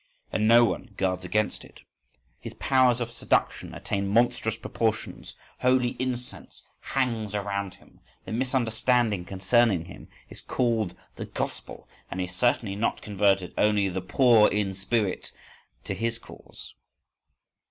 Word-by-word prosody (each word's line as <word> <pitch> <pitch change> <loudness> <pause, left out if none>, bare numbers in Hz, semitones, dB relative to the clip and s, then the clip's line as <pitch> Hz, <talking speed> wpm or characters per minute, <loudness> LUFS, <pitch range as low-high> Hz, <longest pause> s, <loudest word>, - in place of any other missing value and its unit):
And 110 0 +1
no 120 +1 +7
one 115 -2 -4
guards 95 -1 0
against 105 +4 -1
it. - - -16 0.6
His - - -8
powers 130 -3 +3
of 120 0 -3
seduction 115 - 0
attain 100 0 -2
monstrous 110 +1 +2
proportions, 110 -1 -3 0.2
holy 125 -1 +3
incense 125 -1 -5 0.2
hangs 115 -6 -2
around 100 -2 -3
him, - - -22 0.3
the - - -7
misunderstanding 120 -4 +1
concerning 95 0 +2
him - - -12 0.2
is - - -10
called 110 -7 0 0.2
the - - -5
Gospel,—and 95 - -7
he 90 - 0
has 90 0 -10
certainly 115 -3 +1
not 105 +3 -1
converted 100 -3 +1
only 105 -2 +3
the 95 +1 -3
poor 110 +3 +5
in 100 -2 -1
spirit 100 +1 -1 0.5
to - - -3
his 115 0 -2
cause! - - -12
110 Hz, 130 wpm, -26 LUFS, 100-120 Hz, 0.6 s, no